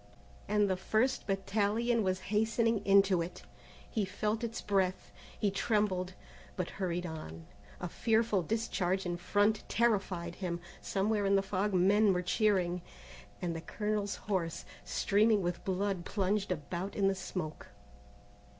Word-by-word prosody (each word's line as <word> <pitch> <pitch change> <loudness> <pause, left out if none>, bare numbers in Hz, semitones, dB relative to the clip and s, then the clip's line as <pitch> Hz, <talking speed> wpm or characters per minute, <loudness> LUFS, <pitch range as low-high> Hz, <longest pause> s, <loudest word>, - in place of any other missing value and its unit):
and 210 0 +3
the 190 - +1
first 220 +7 0
battalion 210 +4 +1
was 185 -2 0
hastening 225 0 +2
into 195 -2 +5
it. 175 +2 -6 0.4
He 220 - -1
felt 210 +4 -2
its 230 -1 -3
breath, 190 -2 0 0.3
he 205 - +1
trembled, 195 -3 0 0.4
but 180 -2 -3
hurried 180 -1 -1
on. 85 - -7 0.3
A 180 - -3
fearful 220 +1 +2
discharge 190 -1 -1
in 175 -1 -1
front 205 +4 +1
terrified 195 -7 +1
him. 175 -2 -2 0.2
Somewhere 205 +1 0
in 200 - +4
the 195 - +3
fog 195 +1 -1
men 200 +3 +5
were 180 0 -1
cheering, 180 -2 +2 0.6
and 170 -2 -1
the 165 - -4
colonel's 210 +3 -2
horse, 170 -5 -2 0.2
streaming 210 0 +2
with 175 0 -2
blood 190 -1 -1
plunged 200 +1 0
about 175 +4 -3
in 195 -2 +2
the 195 - +3
smoke. 180 -4 -5
195 Hz, 140 wpm, -32 LUFS, 180-210 Hz, 0.6 s, into